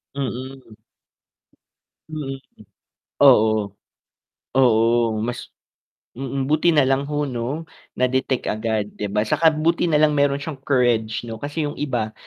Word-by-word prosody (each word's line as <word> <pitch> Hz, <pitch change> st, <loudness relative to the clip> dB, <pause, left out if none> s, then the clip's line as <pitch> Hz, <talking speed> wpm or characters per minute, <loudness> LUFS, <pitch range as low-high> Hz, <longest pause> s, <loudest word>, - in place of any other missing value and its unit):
Mm. 130 Hz, -2 st, -6 dB, 1.4 s
Mm, 145 Hz, -3 st, -4 dB, 0.9 s
oo. 110 Hz, -6 st, +4 dB, 0.8 s
Oo, 115 Hz, -2 st, +3 dB
mas 120 Hz, -, -6 dB, 0.7 s
mm, 135 Hz, +1 st, -3 dB
buti 155 Hz, +3 st, +2 dB
nalang 135 Hz, -3 st, +2 dB
ho, 150 Hz, 0 st, -1 dB
'no, 130 Hz, +6 st, -4 dB, 0.3 s
na-detect 130 Hz, 0 st, 0 dB
agad, 110 Hz, -1 st, -1 dB
'di 105 Hz, -, -4 dB
ba, 105 Hz, +1 st, 0 dB
saka 155 Hz, +6 st, +4 dB
buti 165 Hz, +3 st, 0 dB
nalang 150 Hz, -1 st, +3 dB
meron 140 Hz, -1 st, +2 dB
siyang 145 Hz, -2 st, -7 dB
courage, 120 Hz, -5 st, +1 dB
'no, 115 Hz, -1 st, -6 dB
kasi 145 Hz, +2 st, -3 dB
yung 145 Hz, -, -6 dB
iba 120 Hz, -7 st, -2 dB
130 Hz, 115 wpm, -22 LUFS, 115-145 Hz, 1.4 s, oo